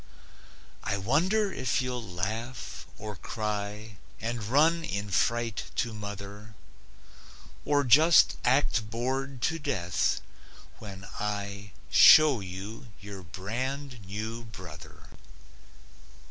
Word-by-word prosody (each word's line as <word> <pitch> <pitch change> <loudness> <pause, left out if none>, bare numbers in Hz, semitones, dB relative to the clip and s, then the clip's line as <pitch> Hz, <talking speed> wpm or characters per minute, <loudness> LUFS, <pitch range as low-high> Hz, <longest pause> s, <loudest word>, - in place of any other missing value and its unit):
I 100 - -1
wonder 185 - +1
if 130 - 0
you'll 125 -1 -2
laugh, 110 +5 -5
or 105 -1 -6
cry 105 +2 -4 0.2
And 115 0 -3
run 155 +9 +3
in 100 -9 -3
fright 115 +3 +1
to 120 -4 -1
mother, 105 0 -8 1.1
Or 145 -1 +3
just 155 +6 +6
act 125 -4 +2
bored 130 +3 -3
to 165 0 +1
death, 90 - 0 0.6
when 100 -2 -9
I 100 -1 -4 0.2
Show 150 -6 +8
you 95 +5 -7
your 100 -1 -8
brand 125 - -5
new 110 +4 -5
brother. 95 -8 -11
110 Hz, 100 wpm, -29 LUFS, 100-130 Hz, 1.1 s, Show